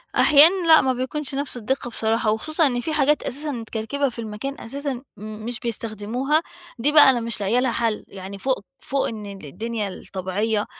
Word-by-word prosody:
أحيانًا 330 +5 +6
لأ 320 -1 +8
ما 260 -1 +1
بيكونش 270 +2 -3
نفس 280 -3 -3
الدقة 245 +2 -2
بصراحة، 225 -1 0
وخصوصًا 310 +7 +1
إن 245 -2 -1
في 315 - -2
حاجات 300 0 +2
أساسًا 295 +3 -2
متكركبة 230 +3 -2
في 235 - -10
المكان 225 +5 -5
أساسًا 280 +3 -3 0.2
م 210 - -11 0.2
مش 240 -2 -3
بيستخدموها، 235 +6 -1 0.4
دي 290 +5 +2
بقى 295 -3 +8
أنا 245 -2 +3
مش 230 -2 -2
لاقية 220 +5 +2
لها 255 -1 +1
حل. 230 -2 -1
يعني 195 +1 -8
فوق 255 0 -1
فوق 275 0 -1
إن 215 -2 -6 0.2
الدنيا 215 +7 -4
الطبيعية 200 +4 -2
240 Hz, 180 wpm, -23 LUFS, 215-280 Hz, 0.4 s, لأ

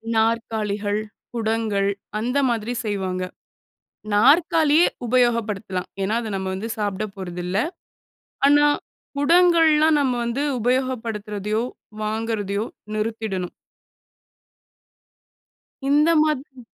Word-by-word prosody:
நாற்காலிகள், 220 -2 0 0.4
குடங்கள் 220 -3 0 0.3
அந்த 250 +5 -1
மாதிரி 230 0 -1
செய்வாங்க. 190 -3 -2 0.9
நாற்காலியே 310 +7 +5 0.2
உபயோகப்படுத்தலாம். 225 -6 0
ஏன்னா 210 +3 0
அத 220 -2 -5
நம்ம 190 0 -3
வந்து 215 +4 -5
சாப்பிட 205 -1 -1
போறதில்ல. 180 -1 -4 0.9
ஆனா 290 +1 +6 0.5
குடங்கள்லாம் 320 -1 +5
நம்ம 260 -3 +1
வந்து 235 +4 -1 0.2
உபயோகப்படுத்துறதையோ 225 -4 -1 0.4
வாங்குறதையோ 215 -2 -2 0.3
நிறுத்திடணும். 215 -4 -2 2.4
இந்த 300 +3 +4
மாதிரி 275 -4 -3
225 Hz, 80 wpm, -23 LUFS, 205-260 Hz, 2.4 s, ஆனா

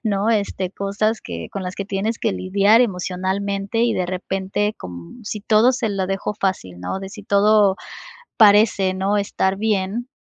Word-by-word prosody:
¿no? 205 -1 0
Este, 200 -4 0
cosas 200 +3 -1
que 85 -1 -7
con 195 - -4
las 180 0 -5
que 200 - -3
tienes 205 +4 -2
que 220 - 0
lidiar 200 +5 +3
emocionalmente 195 +1 -1
y 235 -1 +2
de 180 - -1
repente 190 +3 -2
con 90 - -10
si 210 0 -4
todo 220 +3 +4
se 245 -3 -1
lo 195 -2 -1
dejo 195 +2 -2
fácil, 95 - -3
¿no? 90 - -3
De 195 - -6
si 210 0 -10
todo 200 -1 +4 0.6
parece, 205 -3 +5
¿no?, 195 +2 0
estar 195 -1 0
bien 210 +2 -1
200 Hz, 170 wpm, -21 LUFS, 190-215 Hz, 0.6 s, parece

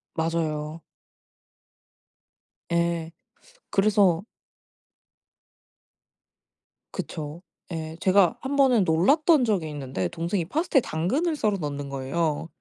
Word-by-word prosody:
맞아요. 160 -1 -2 1.9
예. 170 -1 0 0.6
그래서 195 -4 +3 2.7
그쵸. 155 +1 -6 0.3
예 160 0 -5
제가 195 +4 +4
한번은 265 -5 +3
놀랐던 270 - +4
적이 185 -8 0
있는데 130 -11 -3
동생이 170 +1 -2
파스타에 300 - +2
당근을 265 - -1
썰어 210 -7 0
넣는 145 -2 -4
거예요. 145 +4 -2
170 Hz, 190 characters per minute, -25 LUFS, 155-210 Hz, 2.7 s, 제가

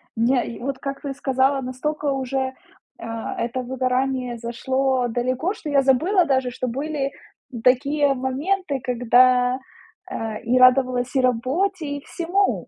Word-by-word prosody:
Мне 240 +1 +1
вот, 270 +2 -3
как 275 0 -5
ты 280 -2 -4
сказала, 270 0 +1
настолько 290 +4 -3
уже, 265 0 -2 0.5
э, - - -10 0.4
это 240 +2 -2
выгорание 255 -1 -1
зашло 260 +2 0
далеко, 255 - -1
что 430 -8 -7
я 280 -1 +4
забыла 330 +9 +3
даже, 260 -4 +1
что 255 - -4
были 275 +2 -2 0.5
такие 280 +3 +3
моменты, 280 +5 -1
когда, 250 +1 +3 0.5
э, 220 -1 -4
и 245 +2 +2
радовалась 255 0 +4
и 265 - +4
работе, 285 +9 0
и 285 - -10
всему. 365 +4 0
260 Hz, 135 wpm, -22 LUFS, 250-280 Hz, 0.5 s, я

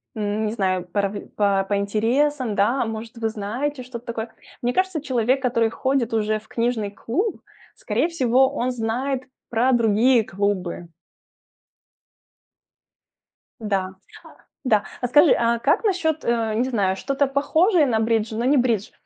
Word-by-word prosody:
м, 210 0 -1
не - - -2
знаю, 185 -4 -1
порав 200 +2 -1 0.2
по 200 -2 +2
по 205 - +1
интересам, 230 +5 0
да, 235 +6 +2
может, 225 +1 -6
вы 225 -1 -1
знаете 245 +7 -3
что-то 245 -1 -9
такое". 225 -1 -5 0.3
Мне 245 +1 +1
кажется, 370 -1 0
человек, 260 -1 +1
который 230 -3 +2
ходит 255 0 -1
уже 215 -1 0
в 215 - -23
книжный 230 -3 -1
клуб, 355 - -2 0.4
скорее - - 0
всего, 265 -5 +3
он 255 -2 -1
знает 250 +3 -2 0.3
про 240 +3 +2
другие 230 +1 +4
клубы. 185 -3 -2 2.7
Да 195 -4 -1 0.8
да. 215 -5 +3 0.2
А 250 - 0
скажи, 295 +5 +5
а 235 0 +1
как 290 - +2
насчет, 335 -7 0
э, 230 -2 0
не 245 +4 0
знаю, 195 -6 +1
что-то 275 +7 0
похожее 315 +5 +3
на 225 -3 +1
бридж, 225 0 0
но 235 +2 -1
не 280 +3 +4
бридж? 235 -5 +1
235 Hz, 145 wpm, -23 LUFS, 215-265 Hz, 2.7 s, скажи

